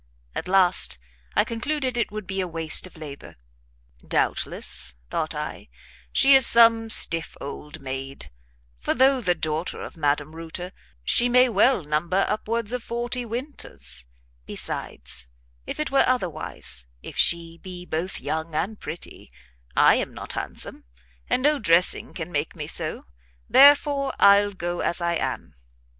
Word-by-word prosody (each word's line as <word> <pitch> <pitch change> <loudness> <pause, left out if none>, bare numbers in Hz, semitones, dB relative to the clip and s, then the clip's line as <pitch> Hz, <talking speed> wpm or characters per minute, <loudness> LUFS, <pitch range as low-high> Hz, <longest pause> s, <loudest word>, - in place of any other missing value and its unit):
At - - -5
last 180 - +4 0.4
I - - +4
concluded 255 +2 -2
it 235 -3 -1
would 215 -1 -6
be 195 +1 -3
a 185 - -3
waste 165 +1 -1
of 180 - -18
labour. 145 -3 -10 0.6
"Doubtless," - - 0 0.2
thought - - -2
I, - - -6 0.4
"she 275 +1 +5
is 265 -2 +8
some 230 -1 +6
stiff 165 -6 +4
old 150 +2 -8
maid; 135 +1 -7 0.5
for - - -1
though 265 +1 +4
the 180 -5 +1
daughter 160 +1 -3
of - - -9
Madame 145 0 -1
Reuter, 165 +2 -7 0.3
she 240 - +3
may 250 +1 +5
well 220 -1 +3
number 170 +6 0
upwards 230 +1 -2
of 250 - -2
forty 240 +1 -3
winters; 230 - -5 0.4
besides, 60 -1 -1 0.4
if - - -6
it 305 - -2
were 275 - +4
otherwise, 90 - -1 0.2
if - - -9
she 170 -1 +2
be 180 -1 -9
both 175 +3 -3
young 160 0 -4
and 205 +7 -2
pretty, 170 - -8 0.5
I - - +6
am - - -4
not - - -7
handsome, - - -3 0.5
and 255 - +1
no 295 0 +3
dressing 175 -3 +2
can 170 0 -6
make 145 - -3
me - - -6
so, - - -2 0.4
therefore 280 0 +5
I'll 200 0 +5
go 175 -1 -4
as 170 - -1
I 170 0 0
am." - - -4
185 Hz, 150 wpm, -24 LUFS, 160-240 Hz, 0.6 s, is